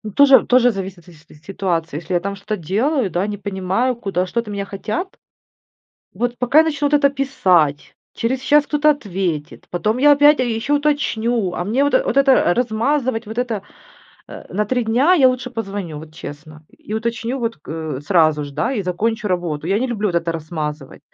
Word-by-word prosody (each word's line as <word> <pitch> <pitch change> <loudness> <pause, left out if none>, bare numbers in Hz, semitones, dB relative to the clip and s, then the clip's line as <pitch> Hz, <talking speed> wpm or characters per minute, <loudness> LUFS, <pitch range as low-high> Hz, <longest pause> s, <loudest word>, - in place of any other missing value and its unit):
Тоже 275 -1 +7
тоже 245 -1 +4
зависит 190 -2 -6
от 165 - -22
си 175 - -15
си 160 0 -19
ситуации, 165 -2 -3
если 170 +3 -5
я 175 - +3
там 200 +2 -4
что-то 210 +2 -4
делаю, 215 - 0
да, 175 +4 -1
не 205 -1 -4
понимаю, 200 +5 -1
куда, 195 -5 -2
что-то 230 +3 -3
от - - -5
меня 200 0 -3
хотят. 215 - -4 1.1
Вот 245 0 -2
пока 270 +6 +5
начнут 295 -2 0
это 280 -1 +4
писать, 185 - +1 0.2
через 250 +3 -1
час 295 +2 +3
кто-то 300 0 +3
ответит, 185 - -3
потом 215 +7 -1
я 290 +2 +6
опять. 290 0 +5
А - - +2
ещё 235 +3 -2
уточню, 240 -8 0
а 175 - -3
мне 245 +9 +1
вот 285 - 0
вот - - -2
это 270 -9 +4
размазывать, 240 +1 0
вот 220 +2 -7
это, 235 -5 -1 0.7
э, - - -10
на 210 +2 +1
3 245 +3 0
дня, 255 +11 +3
я 275 -7 +6
лучше 255 0 -3
позвоню, 195 -9 -5
вот 155 0 -12
честно. 155 0 -10 0.3
И 215 - -1
уточню 235 +3 -2
вот, 230 -4 -2
к 155 -2 -6
сразу 155 -2 +2
же, 145 - -9
да, 225 - -1
и 205 - -1
закончу 215 +5 -2
работу. 170 -4 -2
Я 195 +3 +1
не 260 - 0
люблю 215 -4 -1
это 170 -1 -1
размазывать. 155 -3 -6
215 Hz, 190 wpm, -19 LUFS, 175-255 Hz, 1.1 s, Тоже